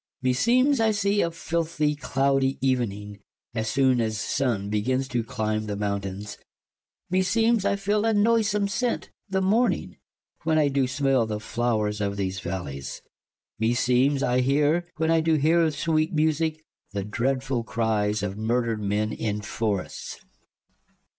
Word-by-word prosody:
Klaius. - - -39
Me 130 0 +3
seemes 255 - +3
I 225 -1 +3
see 205 -1 +1
a 170 - +1
filthie 160 -2 -1
clow 135 -1 +1
die 135 0 0
evening, 105 -6 -1 0.3
As 110 -1 -2
soon 130 -3 +3
as 110 -1 -1
Sunne 110 -8 -1
begins 130 +5 0
to 120 -3 -1
clime 110 0 -2
the 105 - -3
mountaines: 100 0 -4 0.7
Me 185 0 +3
seemes 225 +2 +2
I - - +2
feele 205 +2 0
a 225 - +3
noysome 210 -1 +2
sent, 240 +4 -2 0.2
the 190 0 0
morning 225 +6 +1 0.4
When 160 -1 +1
I 150 -2 +3
doo 135 -1 +1
smell 135 -3 +1
the 105 -1 -3
flowers 110 -3 -1
of 100 0 -1
these 95 -1 -2
v 85 - -5
allies: 70 -7 -5 0.6
Me 115 +2 +2
seemes 130 +3 +2
I 125 0 +2
heare, 150 +6 +2
when 160 0 +1
I 165 -1 +4
doo 160 0 +2
heare 160 +2 +3
sweet 155 +1 0
e - - -12
musique, 155 0 +1 0.3
The 100 -1 -2
dreadfull 130 +4 -1
cries 110 -2 0
of 100 -1 -3
murdred 115 +1 0
men 105 +1 0
in 105 -1 -2
forrests. 105 -2 -3
Strephon. - - -24
130 Hz, 165 wpm, -25 LUFS, 110-165 Hz, 0.7 s, I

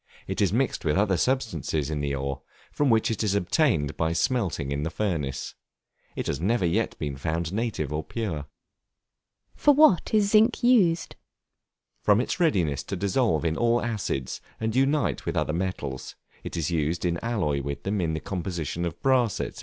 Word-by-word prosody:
It - - -3
is 100 -4 +3
mixed 130 +6 0
with 80 0 +1
other 100 -1 +3
substances 85 - -1
in 75 - -2
the 70 -1 -1
ore, 70 0 -3 0.3
from 145 -2 +1
which 115 -1 +3
it 110 - -1
is 100 -2 +1
obtained 90 - +1
by 80 0 +1
smelting 90 - 0
in 70 0 -1
the 80 - -1
furnace. 80 -9 -2 0.6
It - - -3
has 70 - -2
never 105 +1 +1
yet 85 - 0
been 75 -2 -3
found 80 +4 -2
native 100 - -2
or 75 +1 -2
pure. 90 -11 -4 1.1
For 290 -1 +4
what 280 - +5
is 205 -2 +3
Zinc 225 +3 +4
used? 195 -10 +3 0.9
From 105 0 +4
its 130 +8 -2
readiness 90 - +2
to 100 - -4
dissolve 100 - +1
in 80 -1 +1
all 120 +3 +2
acids, 105 - -3 0.2
and 110 0 -2
unite 135 - +1
with - - -1
other 75 - 0
metals, 80 -7 -4 0.3
it - - -5
is 85 0 -1
used 80 +1 0
in 85 -1 0
alloy 90 -12 0
with 70 0 -5
them 100 0 -1
in 80 -2 0
the - - -2
composition 85 -2 -3
of 85 -1 -5
brass, 125 -6 +3
&c. - - -3
90 Hz, 180 wpm, -26 LUFS, 75-120 Hz, 1.1 s, what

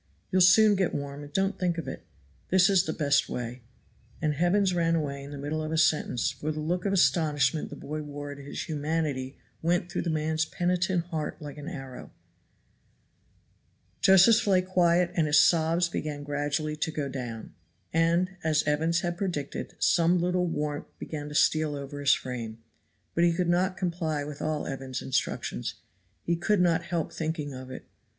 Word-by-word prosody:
You'll 185 - +3
soon 210 +4 +7
get 190 -3 0
warm, 140 0 -5
and 145 - -11
don't 195 +5 0
think 175 -2 0
of 165 - -4
it - - -7 0.4
that 185 0 +5
is 190 -1 +4
the - - -1
best 145 -2 +1
way;" 120 +1 -5 0.6
and 155 -2 0
Evans 180 +5 +2
ran 165 -1 +2
away 140 -3 -2
in 140 - -9
the 145 - -7
middle 145 +3 -3
of 155 0 -4
a 160 - 0
sentence, 150 -5 +2
for 150 +4 -4
the 155 - -5
look 175 +5 -2
of 200 - +1
astonishment 155 -6 +2
the - - -8
boy 155 +1 -5
wore 145 -1 -7
at 140 - -9
his 140 0 -6
humanity 150 -3 -2 0.2
went 175 +2 0
through - - -1
the 170 - -2
man's 155 0 0
penitent 180 +2 0
heart 155 -2 -3
like 150 -1 -8
an 145 - -8
arrow. 135 -7 -8 1.9
Josephs 200 +4 +6
lay 185 -2 +4
quiet 180 -1 +2
and 160 -3 +1
his 150 - +4
sobs 165 +1 +4
began 150 -3 -4
gradually 145 +1 -2
to 155 - -1
go 150 -3 -3
down, 120 -4 -6 0.4
and, 170 +3 +2
as 155 -1 +2
Evans 160 +3 +1
had 175 -1 -2
predicted, 170 -8 -3
some 170 +1 +3
little 180 +1 +1
warmth 150 -3 -3
began 150 -2 -6
to 150 - -8
steal 155 -1 +3
over 140 0 -6
his 140 -1 +4
frame; 115 -3 -6 0.6
but 170 - +2
he 170 -1 +4
could 175 0 0
not 185 +2 +1
comply 165 -5 -2
with 145 0 -7
all 155 -1 -1
Evans's 135 -2 -5
instructions; 95 - -2 0.5
he 170 - +1
could 200 +4 +1
not 170 -2 +2
help 170 -3 -2
thinking 155 -3 -3
of 130 0 -8
it. 130 - -8
155 Hz, 180 wpm, -28 LUFS, 145-175 Hz, 1.9 s, soon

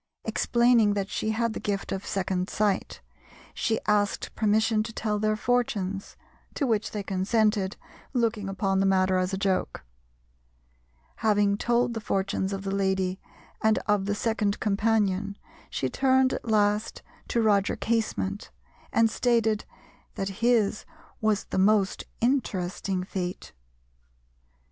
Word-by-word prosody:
Explaining 235 -3 +3
that 195 -1 -2
she 215 - -1
had 230 +1 0
the - - -5
gift 200 -1 -3
of 195 0 -4
second 185 -1 -1
sight, 205 -2 -1 0.5
she 225 -1 0
asked 205 -1 0
permission 220 0 +2
to 220 - -4
tell 215 -2 -2
their 215 0 +1
fortunes, 215 -5 -1 0.4
to 285 - 0
which 220 -3 0
they 210 -2 -4
consented, 200 +1 +1 0.3
looking 225 -5 0
upon 195 0 0
the 195 - +2
matter 185 -1 +3
as 185 +1 -1
a 190 - -2
joke. 190 -1 -1 1.3
Having 205 -2 +2
told 240 +2 +1
the 225 - -4
fortunes 195 -1 -1
of 195 0 -4
the 195 0 -2
lady 190 -1 0 0.4
and 220 0 +3
of 205 -2 +1
the 205 - 0
second 210 -2 0
companion, 205 -1 +1 0.3
she 130 - -1
turned 260 - +3
at 235 - -5
last 210 0 +1 0.2
to 235 - 0
Roger 205 -3 +3
Casement, 220 -3 -2 0.4
and 230 0 +4
stated 225 -2 +1 0.5
that 195 - -2
his 230 -3 +2 0.4
was 215 -2 +1
the - - -3
most 200 0 +2 0.2
interesting 195 -7 0
fate. 180 -1 -5
210 Hz, 135 wpm, -27 LUFS, 195-225 Hz, 1.3 s, and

